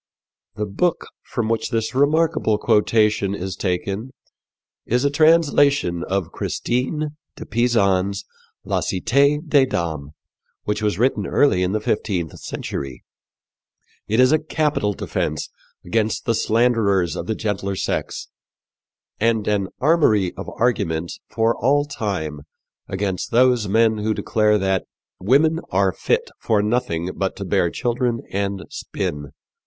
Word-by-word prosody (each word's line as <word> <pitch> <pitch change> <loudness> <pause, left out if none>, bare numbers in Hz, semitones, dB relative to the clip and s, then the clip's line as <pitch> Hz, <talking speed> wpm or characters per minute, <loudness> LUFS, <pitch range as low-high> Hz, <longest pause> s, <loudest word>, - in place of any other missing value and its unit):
'" - - -60
The 105 - -2
book 160 - 0 0.2
from 120 -3 -3
which 115 0 -1
this 115 -1 -1
remarkable 150 -4 +2
quotation 105 -2 +2
is 95 -1 -4
taken 100 +5 -2 0.7
is 125 +4 0
a 140 - +2
translation 145 - +3
of 95 -3 -2
Christine 150 +5 -2 0.2
de - - -8
Pisan's 100 -4 +1 0.4
La - - 0
Cité 140 - +1
des 140 -3 +4
Dames, 80 - -3 0.5
which 105 +1 -2
was 105 -4 0
written 125 +5 +1
early 140 -11 +3
in 90 +1 0
the 110 - +1
fifteenth 95 -6 -2
century. 70 -1 -6 1.0
It 110 +3 +1
is 130 +1 +6
a 155 - +4
capital 150 -9 0
defence 75 -4 -3 0.4
against 110 +4 0
the 115 - +2
slanderers 110 -6 +2
of 85 - -5
the 110 - -1
gentler 100 -3 -2
sex - - -3 0.9
and 110 -1 +1
an 100 -2 +1
armory 125 - +3
of - - -7
arguments 85 -9 0
for 115 +1 +1
all 145 +4 +2
time 95 - -3 0.5
against 95 -1 -2
those 125 -2 +3
men 110 +2 +3
who 110 +1 0
declare 105 -1 +2
that 95 -1 0 0.3
"women 150 - +3
are 95 0 +2
fit - - -1
for 105 -2 +1
nothing 105 -7 -1
but - - -2
to - - -6
bear 85 - +2
children 120 +2 -1
and 100 -1 -2
spin." 75 -1 -4
110 Hz, 135 wpm, -21 LUFS, 95-125 Hz, 1.0 s, is